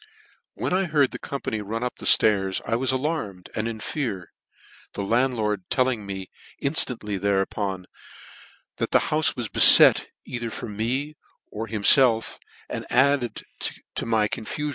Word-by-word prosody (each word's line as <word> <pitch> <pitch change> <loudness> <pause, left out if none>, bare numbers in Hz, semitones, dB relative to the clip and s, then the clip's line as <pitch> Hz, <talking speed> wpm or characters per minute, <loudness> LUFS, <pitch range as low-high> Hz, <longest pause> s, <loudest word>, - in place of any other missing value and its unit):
" - - -37
When - - -3
I 190 +1 +1
heard 150 -5 +1
the - - -7
company 125 -6 -5
run 110 +3 -5
up 125 - -4
flairs, 95 -3 +3
I 115 - -1
was 130 +3 0
alarmed, 130 - -4
and 110 +1 -3
in 115 -1 -6
fear; 110 - -5 0.6
the 100 - -4
landlord 110 -3 -1
telling 125 -6 0
me 95 -1 -7 0.3
inftantly 120 -8 -1
thereupon, 95 -1 -2 0.9
that - - -2
the - - +4 0.2
houfe 155 0 +1
was 120 -4 -4
bcfet, - - +8 0.2
either 120 -2 -5
for 115 - -7
me 125 +8 -3 0.3
or 110 +2 -6
himfelf, 115 +2 +3 0.3
added 135 -3 0 0.5
to - - -4
my 110 -2 +1
confufion. 150 +8 -4
115 Hz, 140 wpm, -24 LUFS, 105-130 Hz, 0.9 s, bcfet